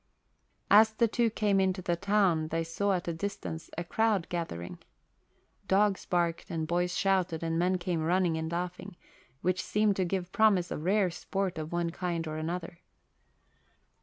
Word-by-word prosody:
As 220 Hz, +1 st, +7 dB
the 230 Hz, +1 st, +3 dB
two 230 Hz, +1 st, +1 dB
came 205 Hz, -2 st, +1 dB
into 190 Hz, -1 st, 0 dB
the 175 Hz, -, +1 dB
town 190 Hz, -4 st, +2 dB
they 165 Hz, +1 st, -1 dB
saw 195 Hz, +5 st, 0 dB
at 180 Hz, -1 st, -2 dB
a 170 Hz, -, -1 dB
distance 165 Hz, -2 st, -5 dB
a 170 Hz, -, -1 dB
crowd 210 Hz, 0 st, +1 dB
gathering. 165 Hz, -, -4 dB, 0.9 s
Dogs 195 Hz, 0 st, +2 dB
barked 170 Hz, -2 st, 0 dB
and 160 Hz, -1 st, -2 dB
boys 175 Hz, +2 st, 0 dB
shouted 185 Hz, -4 st, +1 dB
and 165 Hz, 0 st, 0 dB
men 185 Hz, +2 st, +2 dB
came 175 Hz, -2 st, -2 dB
running 175 Hz, +1 st, +2 dB
and 160 Hz, 0 st, -3 dB
laughing, 180 Hz, +2 st, -4 dB, 0.5 s
which 185 Hz, 0 st, +1 dB
seemed 210 Hz, -1 st, +1 dB
to 190 Hz, -, +2 dB
give 180 Hz, 0 st, -2 dB
promise 200 Hz, -5 st, +3 dB
of -, -, -3 dB
rare 195 Hz, -1 st, +2 dB
sport 190 Hz, 0 st, -3 dB
of 155 Hz, 0 st, -5 dB
one 170 Hz, -1 st, -1 dB
kind 170 Hz, -2 st, -3 dB
or 155 Hz, 0 st, -4 dB
another. 165 Hz, +1 st, -4 dB
180 Hz, 165 wpm, -30 LUFS, 165-195 Hz, 0.9 s, As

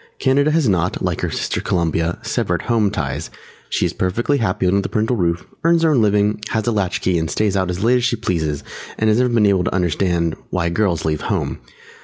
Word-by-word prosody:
Canada 140 Hz, +2 st, +2 dB
has 155 Hz, -3 st, +2 dB
not, 90 Hz, -2 st, 0 dB
like -, -, -2 dB
her -, -, -1 dB
sister -, -, -2 dB
Columbia, 85 Hz, 0 st, 0 dB
"severed 90 Hz, -1 st, -1 dB
home 115 Hz, -3 st, +2 dB
ties"; -, -, -3 dB, 0.4 s
she -, -, 0 dB
is -, -, -1 dB
perfectly 120 Hz, +10 st, 0 dB
happy 95 Hz, -4 st, 0 dB
under 100 Hz, +2 st, +3 dB
the -, -, -4 dB
parental 110 Hz, +3 st, 0 dB
roof, 85 Hz, -4 st, -1 dB, 0.2 s
earns 165 Hz, 0 st, +3 dB
her 160 Hz, -, +4 dB
own 130 Hz, -6 st, +3 dB
living, 105 Hz, 0 st, +2 dB
has 110 Hz, -2 st, -1 dB
a 120 Hz, -, +1 dB
latch 100 Hz, -5 st, -1 dB
key 90 Hz, -2 st, +1 dB
and 80 Hz, 0 st, -2 dB
stays 100 Hz, +6 st, 0 dB
out 95 Hz, -2 st, 0 dB
as 90 Hz, +2 st, -3 dB
late 125 Hz, +2 st, +4 dB
as 125 Hz, -, -1 dB
she 120 Hz, -, +2 dB
pleases 80 Hz, -, -2 dB, 0.3 s
and 110 Hz, 0 st, +2 dB
has 110 Hz, -, +2 dB
never 125 Hz, 0 st, +3 dB
been 115 Hz, -3 st, +3 dB
able 95 Hz, -3 st, +3 dB
to 90 Hz, -, -1 dB
understand 85 Hz, -2 st, 0 dB
"why 85 Hz, -2 st, 0 dB
girls 90 Hz, -2 st, 0 dB
leave 75 Hz, -1 st, -1 dB
home." -, -, -2 dB
100 Hz, 225 wpm, -19 LUFS, 85-115 Hz, 0.4 s, her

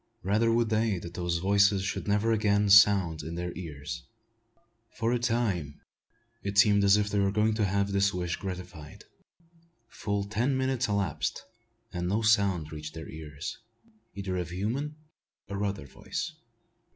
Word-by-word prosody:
Rather 110 Hz, +5 st, +2 dB
would 115 Hz, -1 st, +2 dB
they 110 Hz, -2 st, +1 dB
that 85 Hz, 0 st, -8 dB
those 85 Hz, -1 st, -1 dB
voices 100 Hz, +2 st, +3 dB
should 95 Hz, -, -3 dB
never 105 Hz, +2 st, +2 dB
again 105 Hz, -2 st, +2 dB
sound 95 Hz, -6 st, +6 dB
in 80 Hz, +3 st, -6 dB
their 90 Hz, 0 st, -4 dB
ears. 75 Hz, -5 st, -7 dB, 0.9 s
For 115 Hz, +1 st, +1 dB
a 120 Hz, -, +1 dB
time 110 Hz, -, -1 dB, 0.6 s
it 100 Hz, 0 st, -4 dB
seemed 100 Hz, -1 st, +6 dB
us 100 Hz, 0 st, +6 dB
if 105 Hz, -1 st, 0 dB
they 105 Hz, -, +1 dB
were 100 Hz, 0 st, +2 dB
going 110 Hz, +2 st, +2 dB
to 110 Hz, -1 st, +1 dB
have 100 Hz, +1 st, 0 dB
this 100 Hz, 0 st, +2 dB
wish 90 Hz, -2 st, -2 dB
gratified. 90 Hz, -5 st, -8 dB, 0.9 s
Full 100 Hz, -1 st, -2 dB
ten 120 Hz, +7 st, 0 dB
minutes 130 Hz, -1 st, 0 dB
elapsed, 100 Hz, -6 st, -1 dB, 0.5 s
and 90 Hz, -1 st, -2 dB
no 105 Hz, +5 st, 0 dB
sound 100 Hz, -7 st, +2 dB
reached 75 Hz, 0 st, -7 dB
their 80 Hz, 0 st, -7 dB
ears, 75 Hz, -2 st, -7 dB, 0.6 s
either 95 Hz, -2 st, -3 dB
of 90 Hz, -2 st, -3 dB
human 120 Hz, +12 st, -3 dB, 0.5 s
or 100 Hz, 0 st, -3 dB
other 100 Hz, -5 st, -3 dB
voice. -, -, -5 dB
100 Hz, 155 wpm, -29 LUFS, 90-105 Hz, 0.9 s, sound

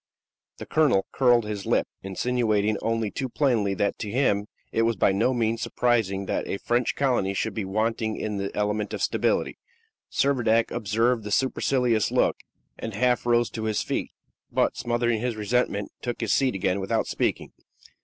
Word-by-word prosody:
The -, -, -7 dB
colonel 145 Hz, -11 st, +2 dB
curled 120 Hz, -3 st, +3 dB
his 105 Hz, -2 st, -5 dB
lip, -, -, +2 dB
insinuating 110 Hz, +1 st, 0 dB
only 115 Hz, -2 st, -1 dB
too 130 Hz, -2 st, -3 dB
plainly 115 Hz, -8 st, +1 dB
that 100 Hz, +2 st, -1 dB
to 105 Hz, -, -4 dB
him 105 Hz, -4 st, +1 dB, 0.2 s
it 115 Hz, -, +1 dB
was 115 Hz, 0 st, +2 dB
by 95 Hz, -, +3 dB
no 105 Hz, +6 st, +2 dB
means 115 Hz, -2 st, 0 dB
surprising 110 Hz, -6 st, 0 dB
that -, -, -2 dB
a -, -, -2 dB
French 120 Hz, +3 st, 0 dB
colony 120 Hz, -8 st, +1 dB
should 110 Hz, +2 st, -1 dB
be 105 Hz, -2 st, -3 dB
wanting 110 Hz, +2 st, -1 dB
in 105 Hz, -1 st, -3 dB
the 100 Hz, 0 st, -2 dB
element 105 Hz, 0 st, -1 dB
of -, -, -3 dB
stability. -, -, 0 dB, 0.5 s
Servadac 120 Hz, -5 st, +2 dB
observed 115 Hz, +1 st, +1 dB
the 105 Hz, -, -5 dB
supercilious 125 Hz, -1 st, +1 dB
look, -, -, +2 dB, 0.4 s
and 110 Hz, -3 st, -5 dB
half 125 Hz, +2 st, +1 dB
rose 120 Hz, 0 st, +3 dB
to 110 Hz, -1 st, -4 dB
his 110 Hz, -1 st, 0 dB
feet, -, -, -2 dB, 0.4 s
but, -, -, +1 dB
smothering 120 Hz, -2 st, 0 dB
his 120 Hz, -2 st, -1 dB
resentment, 105 Hz, -2 st, -1 dB
took 120 Hz, -1 st, -4 dB
his 115 Hz, -, +1 dB
seat 135 Hz, -4 st, +2 dB
again 95 Hz, 0 st, 0 dB
without 95 Hz, -, 0 dB
speaking. -, -, -2 dB
115 Hz, 170 wpm, -25 LUFS, 105-120 Hz, 0.5 s, curled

